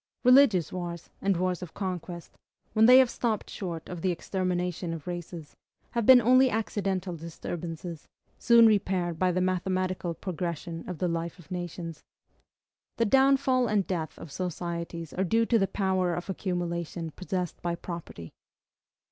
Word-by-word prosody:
Religious 250 - +5
wars, 175 -2 -6
and 195 -2 +1
wars 180 0 -1
of 180 -3 -8
conquest, 180 -3 -5 0.4
when 220 +1 +5
they 250 +1 +9
have 260 -1 +7
stopped 230 -3 -2
short 170 -4 -5
of 180 -2 -6
the 185 - +1
extermination 180 -1 -2
of 160 -3 -7
races, 175 -3 -7 0.4
have 235 -3 -1
been 260 -1 +10
only 255 +3 +5
accidental 195 -5 -2
disturbances, 165 0 -6 0.3
soon 235 -1 +6
repaired 185 -6 +1
by 185 -1 +3
the 180 - 0
mathematical 185 -1 -1
progression 170 -2 -4
of 180 - -4
the 180 - 0
life 170 0 -3
of 175 0 -17
nations. 175 -2 -5 1.0
The 230 - +2
downfall 265 +1 +4
and 210 -3 +1
death 165 -4 -3
of 155 - -10
societies 170 -1 -4
are 190 - 0
due 225 +5 +2
to 230 0 +3
the 195 - +2
power 185 -3 0
of 175 +3 -4
accumulation 170 -3 -3
possessed 180 0 -4
by 170 -1 -1
property. 170 - -8
180 Hz, 150 wpm, -28 LUFS, 170-200 Hz, 1.0 s, been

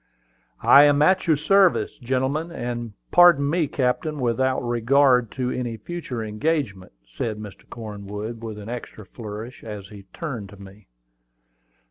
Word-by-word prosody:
"I 145 +1 +8
am 145 0 +4
at 185 +3 +3
your 160 - +5
service, 185 +5 +2
gentlemen; 130 +6 -1
and, 120 -6 -5 0.2
pardon 175 -5 +6
me, 160 +1 +1
captain, 140 +4 -1
without 130 +1 +1
regard 125 +1 +3
to 130 -2 -2
any 120 -3 -3
future 145 -2 -5
engagement," 105 - -2
said 105 - -4
Mr. 105 -2 -11
Cornwood, 105 0 -7
with 110 -2 -6
an 105 0 -9
extra 115 -3 -7
flourish, 110 +4 -9
as 105 -3 -8
he 100 -2 -12
turned 125 - -6
to 100 - -13
me. 100 0 -14
120 Hz, 140 wpm, -23 LUFS, 105-145 Hz, 0.2 s, I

